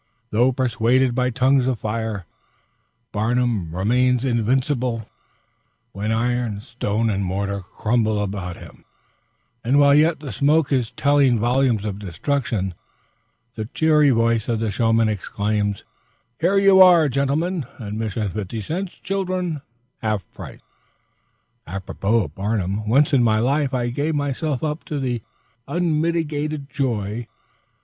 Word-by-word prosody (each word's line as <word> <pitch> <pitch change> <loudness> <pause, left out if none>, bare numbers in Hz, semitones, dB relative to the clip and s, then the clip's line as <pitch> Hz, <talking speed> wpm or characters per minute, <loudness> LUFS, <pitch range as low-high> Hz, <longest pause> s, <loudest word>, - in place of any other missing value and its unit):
Though 120 +4 +3
pursued 125 0 +1
by 125 +1 +1
tongues 130 +1 +2
of 130 -2 0
fire, 110 -3 -3 0.9
Barnum 110 -5 0
remains 125 +6 +2
invincible 125 -1 0 0.8
when 105 +3 -3
iron, 120 -2 0
stone, 110 0 -2
and 100 -1 -1
mortar 100 +2 -2
crumble 110 +3 -1
around 95 -3 -4
him; - - -14 0.8
and 130 +4 +2
while 140 0 +6
yet 155 +2 +4
the 145 -4 -7
smoke 150 +1 +2
is 125 -5 +1
telling 140 -1 +3
volumes 120 -1 +1
of 100 -1 -4
destruction, 100 - -2 0.8
the 110 -2 -5
cheery 150 -2 +4
voice 115 -2 +1
of 115 -2 0
the 110 -2 -1
showman 115 +1 +2
exclaims, 105 0 -2 0.6
"Here 180 +5 +2
you 195 -1 +6
are, 175 -4 +7
gentlemen; 140 +4 -1
admission 110 -1 -3
fifty 105 +2 -4
cents, 175 - -5
children 185 -5 -2 0.4
half 110 -3 -1
price." - - -10 1.1
Apropos 95 +4 -1
of 75 -3 -9
Barnum, 100 +1 -2
once 145 +5 +3
in 135 - +5
my 110 -2 +3
life 135 +4 +1
I 120 -2 -1
gave 145 +6 -1
myself 145 0 -2
up 155 +1 -2
to 130 -5 -2 0.5
unmitigated 155 -3 -1
joy. 115 -5 -2
120 Hz, 125 wpm, -22 LUFS, 105-145 Hz, 1.1 s, are